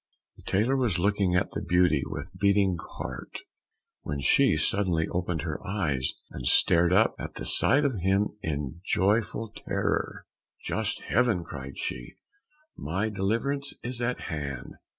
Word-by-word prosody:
The - - -15
tailor 110 +8 +1
was 120 -9 +1
looking 100 0 +2
at 90 +2 +1
the - - -4
beauty 90 -4 +3
with 75 +6 -6
beating 100 -1 +3 0.2
heart, - - -6 0.6
when 70 -1 -4
she 70 - +4
suddenly 90 -5 +1
opened 90 -3 -2
her 80 -3 -4
eyes, 85 -10 -1 0.2
and 60 -2 -5
started 85 +6 +5
up 110 - +4
at - - -6
the - - -5
sight 145 +1 +5
of 130 -8 0
him 95 +3 +2
in 75 +1 -4
joyful 105 +3 +1
terror. - - -2 0.4
"Just - - -2
Heaven!" 115 -6 +1
cried 70 -3 -8
she, - - -5 0.6
"my 95 +7 -2
deliverance 115 +8 -1
is 120 0 -4
at 120 +1 -1
hand! 70 -6 -5
95 Hz, 145 wpm, -27 LUFS, 80-105 Hz, 0.6 s, started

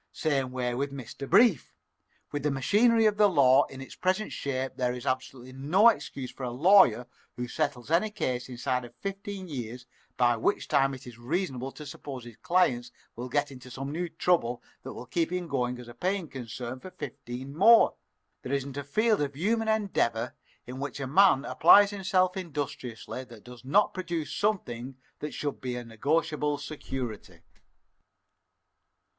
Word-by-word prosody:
Same 135 -5 -1
way 125 -1 -2
with 140 +3 -2
Mr. 140 0 -8
Brief. 225 - +4 0.6
With 145 - -2
the 150 - +1
machinery 220 - +3
of 210 -1 +3
the 210 -1 +6
law 140 -5 +5
in 135 0 -10
its 135 - -9
present 185 +3 -1
shape 135 -1 -3
there 125 -1 0
is 125 -1 -7
absolutely 130 -1 -3
no 165 - +5
excuse 135 - -4
for - - -13
a 125 - -2
lawyer 125 - +5 0.3
who 125 0 -4
settles 145 -1 -2
any 180 +6 +3
case 130 -12 -3
inside 125 0 -2
of 120 0 -12
fifteen 195 +4 -6
years, 125 -4 -6 0.3
by 120 -1 +4
which 115 - 0
time 135 0 +2
it 130 - -12
is 120 -2 -11
reasonable 135 -1 -2
to 150 - -10
suppose 135 -3 -8
his 120 -2 -11
client 125 -10 +1 0.3
will 125 +2 -6
get 145 +1 0
into 130 -1 -11
some 135 +3 -5
new 170 +3 -3
trouble 160 -8 0 0.2
that - - -8
will - - -8
keep 165 +7 -1
him 180 -1 -2
going 125 -4 -1
as 125 -1 -10
a 120 - -10
paying 185 +1 -1
concern 125 -1 -6
for 185 - -9
fifteen 135 -3 -7
more. 225 +7 +7 0.5
There 130 - -4
isn't 140 0 -2
a 140 - -3
field 215 - +2
of 140 -1 -2
human 220 +8 0
endeavor 125 - 0 0.3
in 125 +1 -7
which 140 -1 -5
a 135 - -2
man 150 0 +5
applies 205 0 +6
himself 185 -2 +1
industriously 140 -8 -5
that 115 -4 -14
does 125 0 -12
not 195 +11 +3
produce 170 -4 -3
something 135 - -2 0.2
that 150 - -5
should 145 -2 -3
be 125 -1 -3
a 120 0 -5
negotiable 150 +5 0
security." 130 - -6
140 Hz, 175 wpm, -28 LUFS, 125-180 Hz, 0.6 s, more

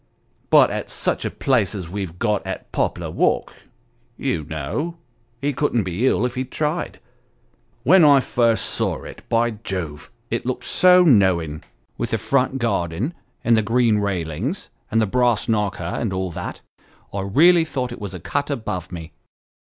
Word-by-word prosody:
But - - +6
at - - -4
such - - -1
a - - 0
place 110 -7 +1
as 95 -4 -5
we've 90 -2 -5
got 105 -1 0
at - - -6
Poplar - - -1
Walk, - - +1 0.6
you 80 - -1
know, 80 - -4 0.4
he 145 +2 -1
couldn't 125 -5 +1
be 95 +7 0
ill 125 - +2
if 125 - -2
he 130 - -2
tried. 150 +6 -3 0.8
When 180 +6 +6
I 145 -2 +7
first 115 -3 +1
saw - - -1
it, - - -10
by 115 0 +2
Jove! 80 -6 -5 0.2
it 120 - -1
looked 130 0 -3
so 180 0 +5
knowing, 95 - +3 0.4
with - - -1
the 115 - 0
front 130 +4 +1
garden, 105 - -1 0.3
and 115 - +4
the 110 - +3
green 115 0 +2
railings, 100 - -3 0.2
and 115 - +2
the 110 - +3
brass 120 +2 +1
knocker, 105 -4 0
and 95 +5 -2
all 95 -1 -2
that - - -6 0.5
I 100 - -2
really 165 - +5
thought 130 -6 -3
it 120 - -8
was 100 -2 -5
a - - -6
cut 145 - -2
above 110 - -4
me." 80 -2 -7
115 Hz, 170 wpm, -22 LUFS, 95-130 Hz, 0.8 s, I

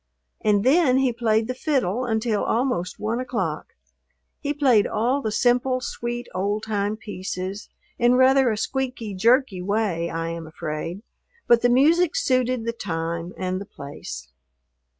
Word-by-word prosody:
And 205 -1 +3
then 265 0 +4
he 265 -2 +2
played 220 -2 +1
the 255 - -2
fiddle 255 - 0
until 220 -2 0
almost 230 -8 -1
one 220 +3 -1
o'clock. 255 - -3 0.6
He 290 - -2
played 265 -8 +3
all 245 +6 0
the 220 - -2
simple, 250 +3 +2
sweet, 240 0 -4
old 205 +3 -1
time 210 -1 -1
pieces, 190 -2 -5 0.3
in 240 +1 +4
rather 260 0 +5
a 215 - -1
squeaky, 250 -3 -3
jerky 230 0 +2
way, 190 -4 -1
I 165 0 -3
am 165 -1 -6
afraid, 160 +5 -5 0.4
but 235 -1 +5
the 245 - +3
music 315 +7 +4
suited 255 -2 +1
the 230 - -1
time 170 -4 -4
and 185 0 -2
the - - -6
place. 65 - -9
225 Hz, 150 wpm, -24 LUFS, 185-255 Hz, 0.6 s, rather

